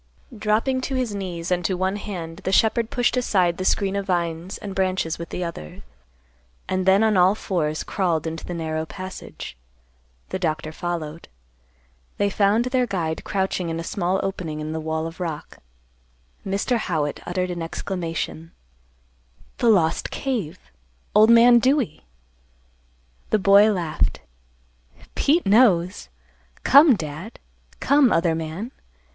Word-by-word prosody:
Dropping 220 Hz, +5 st, 0 dB
to 265 Hz, +1 st, -3 dB
his 250 Hz, -5 st, -1 dB
knees 180 Hz, -3 st, -5 dB
and 180 Hz, 0 st, +1 dB
to 185 Hz, +2 st, 0 dB
one 190 Hz, +2 st, 0 dB
hand 170 Hz, -6 st, -6 dB
the 190 Hz, -1 st, -3 dB
shepherd 225 Hz, +3 st, +2 dB
pushed 245 Hz, 0 st, +1 dB
aside 185 Hz, -8 st, +1 dB
the 185 Hz, -, -3 dB
screen 195 Hz, +1 st, +1 dB
of 200 Hz, 0 st, -3 dB
vines 170 Hz, 0 st, -2 dB
and 200 Hz, -2 st, -7 dB
branches 185 Hz, -4 st, -1 dB
with 170 Hz, -, -6 dB
the 180 Hz, -, -4 dB
other, 75 Hz, -, -7 dB, 0.8 s
and 185 Hz, 0 st, -1 dB
then 195 Hz, +3 st, +5 dB
on 215 Hz, -3 st, +3 dB
all 185 Hz, +3 st, +5 dB
fours 155 Hz, -7 st, -2 dB
crawled 175 Hz, -6 st, -1 dB
into 165 Hz, 0 st, -5 dB
the 175 Hz, -, -5 dB
narrow 160 Hz, -1 st, -2 dB
passage. 185 Hz, -, -8 dB, 0.7 s
The 190 Hz, -, -3 dB
Doctor 155 Hz, -3 st, -2 dB
followed. 165 Hz, -1 st, -5 dB, 0.9 s
They 200 Hz, 0 st, +1 dB
found 205 Hz, +4 st, +2 dB
their 255 Hz, -1 st, +1 dB
guide 170 Hz, -6 st, -2 dB
crouching 190 Hz, -3 st, -1 dB
in 165 Hz, 0 st, -3 dB
a -, -, -4 dB
small 185 Hz, +2 st, -1 dB
opening 175 Hz, -5 st, -4 dB
in 155 Hz, 0 st, -4 dB
the 160 Hz, -, -3 dB
wall 160 Hz, 0 st, -2 dB
of 165 Hz, +2 st, -8 dB
rock. 160 Hz, -4 st, -5 dB, 0.8 s
Mr. 200 Hz, +5 st, 0 dB
Howitt 160 Hz, -9 st, -2 dB
uttered 180 Hz, 0 st, -1 dB
an 175 Hz, -1 st, -4 dB
exclamation, 165 Hz, -1 st, -4 dB, 1.1 s
"The 240 Hz, -, +3 dB
lost 170 Hz, -7 st, +2 dB
cave! 240 Hz, -, -3 dB, 0.6 s
Old 215 Hz, +1 st, +6 dB
man 235 Hz, +1 st, +7 dB
Dewey!" 255 Hz, -, 0 dB, 1.2 s
The -, -, +3 dB
boy 200 Hz, +2 st, +6 dB
laughed, 170 Hz, -6 st, -1 dB, 0.9 s
"Pete 325 Hz, +5 st, +2 dB
knows. 190 Hz, -, +3 dB, 0.5 s
Come, 280 Hz, -1 st, +7 dB
Dad. 160 Hz, +5 st, -7 dB, 0.4 s
Come, 280 Hz, -4 st, +4 dB
other 165 Hz, 0 st, +2 dB
man. 165 Hz, +9 st, -5 dB
185 Hz, 140 wpm, -23 LUFS, 165-210 Hz, 1.2 s, man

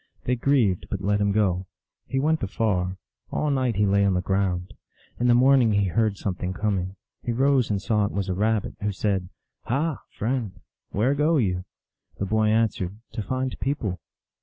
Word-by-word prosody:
They 125 Hz, -, +1 dB
grieved, 120 Hz, -8 st, +2 dB
but 100 Hz, -2 st, -3 dB
let 100 Hz, +1 st, +1 dB
him 100 Hz, 0 st, +2 dB
go. 95 Hz, -3 st, +1 dB, 0.4 s
He 135 Hz, -, -1 dB
went 155 Hz, +3 st, +1 dB
afar. 95 Hz, -3 st, 0 dB, 0.3 s
All 150 Hz, -, 0 dB
night 130 Hz, -4 st, +1 dB
he 105 Hz, +1 st, +3 dB
lay 100 Hz, 0 st, +3 dB
on 100 Hz, -2 st, +3 dB
the 90 Hz, -, +1 dB
ground. 95 Hz, -1 st, -1 dB, 0.5 s
In 120 Hz, -, +2 dB
the 120 Hz, -, +6 dB
morning 130 Hz, -3 st, +5 dB
he 100 Hz, -2 st, +2 dB
heard 105 Hz, +2 st, +1 dB
something 90 Hz, -2 st, -3 dB
coming. 95 Hz, -2 st, -1 dB, 0.3 s
He 120 Hz, -, -2 dB
rose 130 Hz, 0 st, +3 dB
and 100 Hz, -2 st, 0 dB
saw 105 Hz, +1 st, +1 dB
it -, -, -2 dB
was 100 Hz, -1 st, -2 dB
a 95 Hz, -, 0 dB
Rabbit, 105 Hz, +2 st, 0 dB
who 105 Hz, 0 st, 0 dB
said, 95 Hz, -2 st, -1 dB, 0.2 s
" -, -, -59 dB
Ha, 145 Hz, +3 st, 0 dB, 0.2 s
friend, 115 Hz, -3 st, -2 dB, 0.3 s
where 120 Hz, +7 st, +1 dB
go 150 Hz, +3 st, +2 dB
you? 90 Hz, -7 st, 0 dB, 0.3 s
" -, -, -40 dB
The 100 Hz, -, -2 dB
boy 110 Hz, +2 st, +2 dB
answered, 105 Hz, -3 st, +1 dB
" -, -, -49 dB
To 110 Hz, -, -3 dB
find 130 Hz, +4 st, -2 dB
people." 115 Hz, -, -2 dB
105 Hz, 195 wpm, -25 LUFS, 95-125 Hz, 0.5 s, the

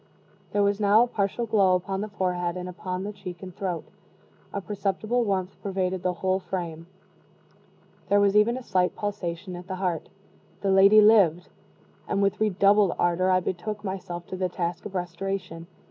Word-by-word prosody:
There 205 Hz, -, +2 dB
was 200 Hz, 0 st, +1 dB
now 210 Hz, +2 st, +5 dB
a -, -, 0 dB
partial 210 Hz, +1 st, -1 dB
glow 200 Hz, -4 st, +3 dB
upon 190 Hz, +2 st, -2 dB
the 210 Hz, -, -3 dB
forehead 180 Hz, -3 st, -2 dB
and 180 Hz, 0 st, -5 dB
upon 180 Hz, +1 st, -5 dB
the 210 Hz, +1 st, -5 dB
cheek 190 Hz, -2 st, -9 dB
and 185 Hz, -2 st, -9 dB
throat; 180 Hz, -4 st, -3 dB, 0.7 s
a 200 Hz, -, -3 dB
perceptible 205 Hz, +4 st, -1 dB
warmth 195 Hz, -3 st, -2 dB
pervaded 190 Hz, -2 st, -2 dB
the 180 Hz, 0 st, 0 dB
whole 190 Hz, 0 st, +2 dB
frame; 170 Hz, -3 st, -5 dB, 1.2 s
there 205 Hz, -, +5 dB
was 200 Hz, 0 st, +3 dB
even 220 Hz, +4 st, +4 dB
a 260 Hz, -, -7 dB
slight 185 Hz, -5 st, +1 dB
pulsation 185 Hz, -3 st, -4 dB
at 175 Hz, +1 st, -9 dB
the 190 Hz, -, -4 dB
heart. 180 Hz, -4 st, -2 dB, 0.5 s
The 195 Hz, -, +1 dB
lady 200 Hz, +3 st, +7 dB
lived; 195 Hz, -6 st, +5 dB, 0.6 s
and -, -, 0 dB
with 200 Hz, +1 st, +1 dB
redoubled 200 Hz, -2 st, +4 dB
ardor 175 Hz, +2 st, +2 dB
I 185 Hz, 0 st, +3 dB
betook 200 Hz, +4 st, -4 dB
myself 180 Hz, -3 st, -5 dB
to -, -, -4 dB
the 185 Hz, -1 st, -1 dB
task 175 Hz, 0 st, -3 dB
of 195 Hz, -, -12 dB
restoration. 175 Hz, -1 st, -4 dB
190 Hz, 175 wpm, -26 LUFS, 180-205 Hz, 1.2 s, lady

